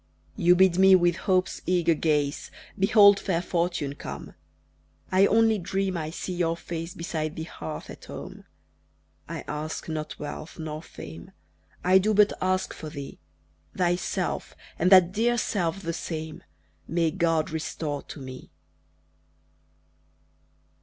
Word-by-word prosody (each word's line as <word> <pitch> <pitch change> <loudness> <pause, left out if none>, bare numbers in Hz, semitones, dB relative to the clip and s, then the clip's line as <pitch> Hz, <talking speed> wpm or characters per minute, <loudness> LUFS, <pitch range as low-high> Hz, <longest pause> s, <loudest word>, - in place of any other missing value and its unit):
You 175 - +5
bid 185 -1 +4
me 190 0 +8
with 175 -2 +3
hope's 185 0 0
eager 175 -2 +3
gaze 150 -2 0 0.3
Behold 200 0 +7
fair 180 -4 0
fortune 170 -5 -1
come. - - -8 0.8
I 190 +1 +5
only 225 0 +4
dream 190 +1 -1
I 155 -2 -3
see 180 +2 -5
your 170 -2 0
face 165 0 -6
Beside 155 -2 -3
the 160 - -4
hearth 155 -1 -7
at - - -11
home. - - -9 0.8
I - - -4
ask 150 +1 -4
not 155 -1 -4
wealth 150 +2 -7
nor 155 -1 -5
fame, 80 - -10 0.5
I 185 +1 +6
do 210 +2 +1
but 210 0 +5
ask 185 0 0
for 155 - -8
thee! 140 -2 -8 0.6
Thyself 175 0 -1 0.2
and 180 +3 +3
that 185 -2 +8
dear 235 +4 +1
self 195 -4 -1
the 170 - -2
same 160 -2 -5 0.4
May 165 -1 +1
God 165 -4 +1
restore 155 -2 -3
to - - -10
me! 130 -1 -9
170 Hz, 135 wpm, -26 LUFS, 155-190 Hz, 0.8 s, me